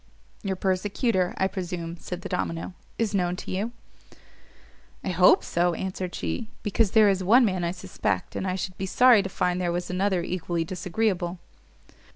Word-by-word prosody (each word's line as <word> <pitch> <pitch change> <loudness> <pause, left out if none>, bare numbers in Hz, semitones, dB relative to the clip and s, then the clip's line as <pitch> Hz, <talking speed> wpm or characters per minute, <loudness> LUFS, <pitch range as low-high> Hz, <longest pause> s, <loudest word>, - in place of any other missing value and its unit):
"Your 195 -2 -2
persecutor, 190 +1 0
I 190 - +2
presume," 180 -3 -4
said 180 +1 -7
the - - -4
domino, 165 -1 -3 0.2
"is 220 -3 0
known 180 -2 +1
to - - -7
you." 205 +5 -2 1.3
"I - - -2
hope 180 0 +5
so," 175 0 +1
answered 185 -1 -4
she, 225 -3 -3
"because 210 0 +2
there 215 -1 +8
is 190 -1 +2
one 235 +7 +6
man 185 -4 0
I 170 - +1
suspect, 185 +1 -3
and 190 - -2
I 185 - 0
should 185 -1 -5
be 190 - -2
sorry 245 +1 +6
to 195 - -4
find 180 0 0
there 175 -1 0
was 175 +1 -3
another 185 -1 +1
equally 175 -1 -2
disagreeable." 180 +1 -1
185 Hz, 175 wpm, -26 LUFS, 180-195 Hz, 1.3 s, there